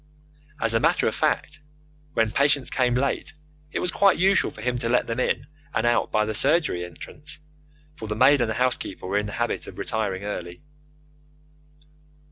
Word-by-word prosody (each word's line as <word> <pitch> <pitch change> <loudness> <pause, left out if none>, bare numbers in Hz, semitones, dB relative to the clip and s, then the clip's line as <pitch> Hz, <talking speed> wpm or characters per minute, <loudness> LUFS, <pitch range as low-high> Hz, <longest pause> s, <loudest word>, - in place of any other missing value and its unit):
As 115 -1 +1
a 115 - +3
matter - - +2
of - - 0
fact, 150 +1 0 0.6
when 115 -1 +2
patients 140 +1 +2
came 125 -1 +2
late 140 +4 -1 0.4
it - - -3
was 180 - 0
quite 195 0 +4
usual 190 +1 +3
for - - -12
him 125 +2 -1
to 115 -1 -1
let 125 - +2
them 115 +1 -3
in 130 - 0 0.3
and - - +1
out 120 0 +2
by 105 0 +2
the 110 - -2
surgery 140 - +2
entrance, 90 - -9 0.6
for 110 -8 -7
the 105 - -3
maid 135 +4 +5
and 120 - +1
the 110 - -2
housekeeper 125 -7 -1
were 100 +2 +1
in 105 - -3
the 100 - -7
habit - - -2
of - - -10
retiring 100 -3 -2
early. 90 -1 -6
120 Hz, 185 wpm, -24 LUFS, 105-140 Hz, 0.6 s, maid